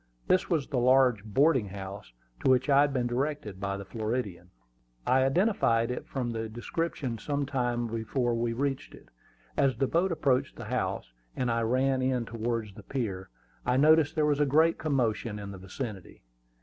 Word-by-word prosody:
This 185 - +2
was 160 -6 +1
the 135 -4 -1
large 125 -4 +4
boarding 130 +2 +3
house 95 -4 -8 0.3
to - - +3
which 130 +2 +3
I 140 +1 +6
had 145 0 +3
been 125 -3 0
directed 120 -5 -2
by 100 0 -2
the 100 - -7
Floridian. 105 -5 -3 0.6
I 130 +1 +4
identified 135 - +2
it 125 - -5
from 125 -3 -3
his 110 0 -3
description 125 +1 -3
some 145 +3 -2
time 120 -3 -1
before 115 +2 -1
we 115 0 0
reached 135 +3 -2
it. - - -18 0.5
As 135 -2 +2
the 135 - +2
boat 175 +7 +1
approached 140 -6 +1
the - - -8
house, - - -3 0.2
and 125 -2 0
I 115 0 +1
ran 130 +3 +1
in 130 -2 0
towards 115 -2 -3
the 105 - -11
pier, 100 -5 -4 0.3
I 125 - +1
noticed 155 +2 +5
there 155 -2 +2
was 145 -1 +2
a 145 - +4
great 160 +4 +3
commotion 120 -7 0
in 100 -1 -7
the 95 - -9
vicinity. 95 0 -7
125 Hz, 180 wpm, -29 LUFS, 110-140 Hz, 0.6 s, I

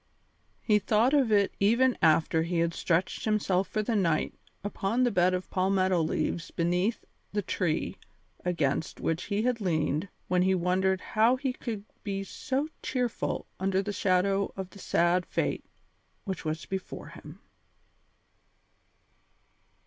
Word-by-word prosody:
He 210 -2 +4
thought 220 +6 +2
of 270 -6 +3
it 200 -2 +3
even 235 +5 +4
after 160 +1 +4
he 170 +1 -1
had 170 0 +1
stretched 170 +2 0
himself 195 -3 +1
for 215 - -1
the 230 +1 0
night 165 -6 +1 0.3
upon 205 +4 0
the 245 - +3
bed 185 -1 +3
of 180 - -5
palmetto 185 -1 +2
leaves 160 +1 -1
beneath 180 +6 0 0.3
the 205 -1 0
tree 170 -3 -1 0.5
against 160 -4 -1
which 165 0 -1
he 205 +1 -1
had 245 -2 0
leaned 155 -1 0 0.2
when 180 -1 +2
he 190 +1 +3
wondered 185 +1 +1
how 225 +3 +5
he 260 -1 -2
could 220 -5 -5 0.2
be 195 -1 -2
so 270 +8 -2
cheerful 250 -3 -2
under 190 0 +1
the 205 +1 -3
shadow 195 +1 +1
of 190 -1 -5
the 200 - -13
sad 175 0 +2
fate - - -2 0.6
which 190 -3 -4
was 155 0 -3
before 190 -1 -6
him. - - -12
190 Hz, 140 wpm, -29 LUFS, 180-215 Hz, 0.6 s, how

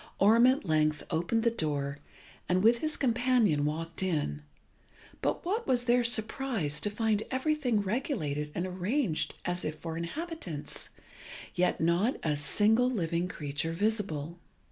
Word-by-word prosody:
Orm 225 +5 +6
at 260 -3 +2
length 155 -2 +1
opened 175 +8 0
the 235 - +3
door, 145 -7 -2 0.5
and 185 +1 +2
with 230 +2 +5
his 310 +2 -1
companion 240 - +2
walked 165 +3 -3
in; 150 - -1 0.8
but - - -1
what 430 +6 -1
was 245 -1 +2
their 245 0 +4
surprise 220 - 0
to 205 - 0
find 215 0 0
everything 260 -4 +1
regulated 190 - -2
and 175 - -1
arranged 185 - -1
as 180 0 -2
if 155 - -3
for 165 -1 -5
inhabitants, 180 - -5 0.6
yet 180 0 +1
not 170 +9 +2
a 150 -2 +1
single 215 - +3
living 170 -6 -1
creature 150 -1 -3
visible. 175 -5 -2
190 Hz, 140 wpm, -30 LUFS, 160-240 Hz, 0.8 s, Orm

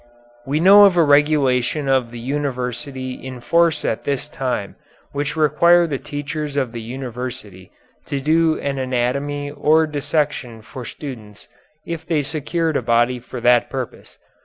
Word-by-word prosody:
We 145 +3 0
know 200 +4 +8
of 190 -3 +3
a 170 - +6
regulation 145 -2 +2
of 130 -3 +2
the 120 - -9
University 130 0 -3
in 130 0 -8
force 170 +5 +2
at 110 - -1
this 140 -2 -2
time, 125 -7 -3 0.4
which 145 0 -3
required 170 +2 +4
the 135 - -1
teachers 145 0 -5
at 130 -4 0
the 115 -1 -6
University 120 -5 -7 0.4
to 140 - -2
do 160 +3 +2
an 140 -1 -2
anatomy 140 +3 -1
or 155 +2 +3
dissection 145 -6 -2
for 125 +2 -9
students 110 -9 -9 0.4
if 170 -1 -5
they 155 -3 0
secured 160 +2 -1
a - - -1
body 120 +1 +2
for 125 +1 -8
that 120 0 +4
purpose. 130 -3 -7
140 Hz, 150 wpm, -20 LUFS, 125-150 Hz, 0.4 s, know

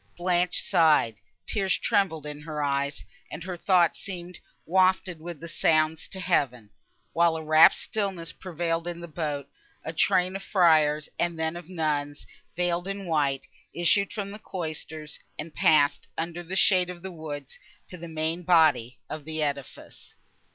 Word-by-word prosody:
—Blanche 180 0 +1
sighed, 150 -10 +3 0.3
tears 195 -3 +1
trembled 160 -7 0
in 150 0 -6
her 150 -1 -4
eyes, 140 0 -1 0.2
and 155 - -7
her 180 0 -5
thoughts 175 -1 +3
seemed 180 -2 -7 0.3
wafted 185 -1 +2
with 170 -2 -7
the 170 - -8
sounds 155 -1 +1
to 190 - -6
heaven. 125 - 0 0.4
While 170 -1 +3
a 160 - -5
rapt 155 +1 +7
stillness 190 -6 -3
prevailed 170 -1 -2
in 175 -1 -4
the 170 - -8
boat, 150 -4 -3 0.4
a 160 - -4
train 180 +3 +2
of 195 - -4
friars, 155 -6 +3
and 170 -1 0
then 160 +1 -1
of 175 0 -9
nuns, 150 -4 -2 0.3
veiled 175 +1 0
in 195 0 -4
white, 145 -5 0 0.3
issued 175 +4 +3
from 200 -2 -4
the 210 - -9
cloisters, 155 -5 -5 0.2
and 155 +1 -6
passed, 145 -2 +3
under 170 +1 -3
the 175 +2 -6
shade 185 -2 +4
of 175 -1 -8
the 190 - -6
woods, 150 -5 -7 0.3
to - - -8
the 170 -1 -8
main 160 +1 -2
body 155 -9 +3
of 155 -1 -6
the 155 +1 -2
edifice. 140 -2 -6
165 Hz, 160 wpm, -27 LUFS, 155-180 Hz, 0.4 s, rapt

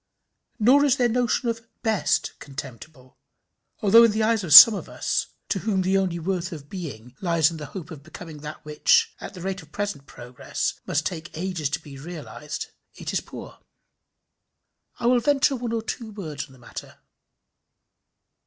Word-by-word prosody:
Nor 255 +6 +5
is 280 -3 +3
their 245 - +3
notion 245 +1 0
of 230 -1 -3 0.2
best 220 -4 0
contemptible, 135 0 -10 0.6
although 225 +3 +7
in - - +4
the 215 +1 0
eyes 220 -1 +1
of 170 - -5
some 160 +9 +12
of 205 - -6
us, - - -2 0.2
to 195 - 0
whom 195 -2 0
the 190 +1 +1
only 190 -3 0
worth 180 +1 -3
of 145 -4 -9
being 130 - -8
lies 170 -3 +2
in 165 - -7
the 150 -2 -7
hope 175 -2 -9
of 155 -4 -9
becoming 160 0 -11
that 150 +1 -9
which, 455 - +3
at - - -8
the 180 - -9
rate 190 +1 -4
of 155 -1 -18
present 200 -9 -4
progress, 125 +1 -4
must 150 +1 0
take 165 -2 -5
ages 175 -5 -2
to 160 +3 -2
be 140 -4 -12
realized, 150 -1 -7 0.3
it - - -6
is - - 0
poor. - - -11 1.4
I - - -5
will 245 +1 +4
venture 280 +1 +2
one 240 -2 -4
or 230 -1 -2
two 225 0 -5
words 155 -8 -6
on 135 - -19
the - - -17
matter. 120 - -10
180 Hz, 180 wpm, -24 LUFS, 150-220 Hz, 1.4 s, some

